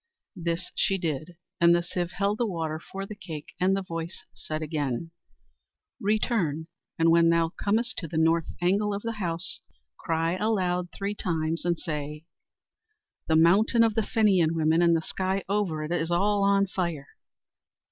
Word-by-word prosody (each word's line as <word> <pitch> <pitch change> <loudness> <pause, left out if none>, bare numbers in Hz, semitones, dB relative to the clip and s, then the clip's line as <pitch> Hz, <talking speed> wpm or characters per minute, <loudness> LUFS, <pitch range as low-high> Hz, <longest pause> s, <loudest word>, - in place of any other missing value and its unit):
This 170 0 -3
she 195 -4 +1
did, 165 -1 -4 0.2
and 170 0 +6
the 175 - +1
sieve 175 0 -3
held 200 +1 0
the 240 - +2
water 160 -4 -3
for 195 +4 -7
the 210 - -7
cake; 170 -2 -8
and 190 +2 +3
the 195 - -2
voice 165 0 -6
said 155 0 -5
again: 150 -1 -2 0.9
"Return, 200 - 0 0.3
and 165 0 +4
when 165 0 +5
thou 165 -1 +3
comest 230 +4 +1
to 165 - -5
the 160 - -4
north 165 +1 +3 0.2
angle 200 +3 +2
of 200 - -5
the 230 -2 -4
house, 175 +1 -2 0.4
cry 165 +1 0
aloud 185 -4 0
three 200 +2 -3
times 165 -4 -2
and 175 -1 +1
say, 150 -1 -5 1.0
'The 160 - +3
mountain 200 +9 +5
of 225 -1 +3
the 225 - +2
Fenian 195 -8 +3
women 160 +1 +3
and 170 -1 +5
the - - -2
sky 190 +2 -2
over 190 -6 0
it 155 - -5
is 165 -1 0
all 200 +4 +2
on 200 0 +4
fire.'" 170 -7 -3
175 Hz, 165 wpm, -27 LUFS, 165-200 Hz, 1.0 s, and